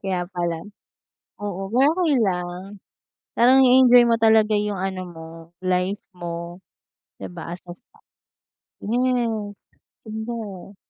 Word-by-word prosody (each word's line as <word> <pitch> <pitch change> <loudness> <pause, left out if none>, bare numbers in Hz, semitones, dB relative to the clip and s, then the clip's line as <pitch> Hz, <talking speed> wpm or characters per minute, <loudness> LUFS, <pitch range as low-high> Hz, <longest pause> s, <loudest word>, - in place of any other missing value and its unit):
Kaya 185 -3 -2
pala. 170 -2 -2 0.9
Oo, 195 -1 -4
pero 265 +5 +4
okey 320 -5 +2
lang. 180 +1 -4 0.5
Parang 260 +3 +5
i-enjoy 250 -1 +7
mo 235 -1 +3
talaga 220 -1 +4
yung 210 -1 0
ano 190 0 -3
mo, 165 -2 -10 0.4
life 185 +2 0
mo, 170 0 -7 0.6
'di - - -6
ba? 170 -1 -7
As 175 - -8
as 175 - -7 0.2
that. - - -24 0.8
Yes, 230 -3 -1 0.5
punda. 220 -3 -7
205 Hz, 120 wpm, -22 LUFS, 180-230 Hz, 0.9 s, i-enjoy